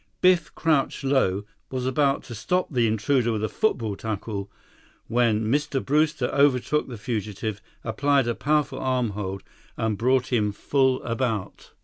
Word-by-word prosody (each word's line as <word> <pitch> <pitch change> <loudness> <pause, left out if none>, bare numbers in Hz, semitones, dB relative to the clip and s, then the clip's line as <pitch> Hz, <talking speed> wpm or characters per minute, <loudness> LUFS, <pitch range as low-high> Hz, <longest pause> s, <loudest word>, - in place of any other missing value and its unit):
Biff, 180 -2 +3
crouched 150 -4 +1
low, 130 -8 +2 0.3
was 130 -1 -3
about 135 +1 +1
to 120 - -9
stop 180 +9 -1
the 120 -3 +3
intruder 115 +3 +1
with 110 -1 -2
a - - +2
football 115 - 0
tackle 105 -1 -4 0.6
when 115 -2 +2
Mr. 145 +4 +1
Brewster 150 -2 +2
overtook 140 +1 +2
the 125 -3 -7
fugitive, 105 -2 -4 0.2
applied 135 +3 +2
a 120 - +1
powerful 150 +2 0
arm 130 -3 0
hold, 95 -1 -5 0.3
and 110 -3 -1
brought 130 +1 +2
him 105 -3 +2
full 130 +3 +1
about. 115 -4 -3
125 Hz, 145 wpm, -25 LUFS, 110-140 Hz, 0.6 s, Biff